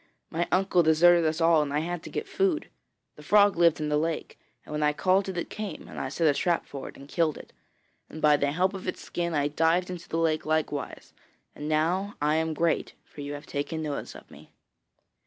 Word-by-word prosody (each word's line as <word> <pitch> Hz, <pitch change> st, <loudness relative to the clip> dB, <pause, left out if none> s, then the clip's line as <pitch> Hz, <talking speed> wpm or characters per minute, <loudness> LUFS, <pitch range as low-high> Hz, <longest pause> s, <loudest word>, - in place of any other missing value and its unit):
My 170 Hz, +1 st, -1 dB
uncle 185 Hz, -1 st, +3 dB
deserted 170 Hz, +1 st, +5 dB
us 155 Hz, +1 st, 0 dB
all, 165 Hz, -1 st, +5 dB
and 145 Hz, -1 st, -2 dB
I 150 Hz, +1 st, 0 dB
had 175 Hz, +1 st, -4 dB
to -, -, -9 dB
get 445 Hz, -, -4 dB
food. 385 Hz, -4 st, 0 dB, 0.5 s
The -, -, -11 dB
frog 205 Hz, -1 st, +4 dB
lived 170 Hz, -2 st, +4 dB
in 150 Hz, -1 st, -2 dB
the 150 Hz, 0 st, +2 dB
lake, 160 Hz, 0 st, -3 dB, 0.3 s
and -, -, -12 dB
when 150 Hz, 0 st, -2 dB
I 150 Hz, 0 st, +3 dB
called 190 Hz, +4 st, +2 dB
it, 185 Hz, -, -5 dB
it 175 Hz, -, -2 dB
came, 210 Hz, -7 st, -6 dB
and -, -, -8 dB
I 130 Hz, -, -3 dB
set 165 Hz, +4 st, -1 dB
a 145 Hz, -, +5 dB
trap 170 Hz, +4 st, 0 dB
for 140 Hz, -, -7 dB
it -, -, -14 dB
and 140 Hz, -, -12 dB
killed 160 Hz, 0 st, 0 dB
it; -, -, -13 dB, 0.6 s
and 155 Hz, -, -9 dB
by 150 Hz, -1 st, +5 dB
the 145 Hz, 0 st, 0 dB
help 185 Hz, +5 st, +1 dB
of 190 Hz, -1 st, -7 dB
its 185 Hz, -, -3 dB
skin 170 Hz, -2 st, -3 dB
I 145 Hz, -1 st, +2 dB
dived 165 Hz, +4 st, +1 dB
into 175 Hz, -2 st, -8 dB
the 165 Hz, -, -2 dB
lake 160 Hz, -1 st, +1 dB
likewise, 155 Hz, -2 st, -2 dB, 0.4 s
and 150 Hz, -, -6 dB
now 175 Hz, +6 st, 0 dB
I 150 Hz, +2 st, +2 dB
am 160 Hz, -1 st, -1 dB
great, 165 Hz, +1 st, 0 dB
for 145 Hz, -, -11 dB
you 145 Hz, 0 st, -5 dB
have 145 Hz, +1 st, -8 dB
taken 160 Hz, +3 st, -3 dB
notice 145 Hz, -2 st, -5 dB
of -, -, -14 dB
me.' -, -, -15 dB
160 Hz, 230 wpm, -27 LUFS, 150-175 Hz, 0.6 s, deserted